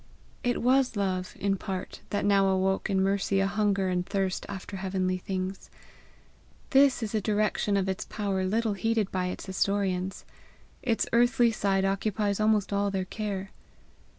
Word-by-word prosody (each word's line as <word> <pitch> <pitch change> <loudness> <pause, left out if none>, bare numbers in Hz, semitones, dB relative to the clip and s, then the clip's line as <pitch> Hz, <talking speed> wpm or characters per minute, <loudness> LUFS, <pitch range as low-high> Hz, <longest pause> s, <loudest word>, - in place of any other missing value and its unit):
It 245 -1 0
was 255 0 +3
love, 185 -2 -2
in 195 0 +1
part, 190 -1 -5
that 205 - -1
now 200 -1 +4
awoke 190 +1 +1
in 190 -1 +2
Mercy 195 0 +1
a 195 - +3
hunger 200 -1 +1
and 180 -1 0
thirst 190 -1 -2
after 195 0 -6
heavenly 185 -1 -1
things. 190 +1 -4 1.0
This 270 -3 +5
is 215 - -4
a 215 - +1
direction 210 0 +1
of 195 -1 0
its 190 -1 -2
power 200 -3 -2
little 220 +2 +1
heeded 220 0 0
by 185 -1 -1
its 180 - -5
historians; 190 -1 -1 0.6
its 230 -4 +1
earthly 240 0 +4
side 195 -3 +1
occupies 200 +1 0
almost 215 -2 +2
all 200 0 +1
their 190 -1 -2
care. 200 -1 -4
195 Hz, 155 wpm, -28 LUFS, 190-215 Hz, 1.0 s, This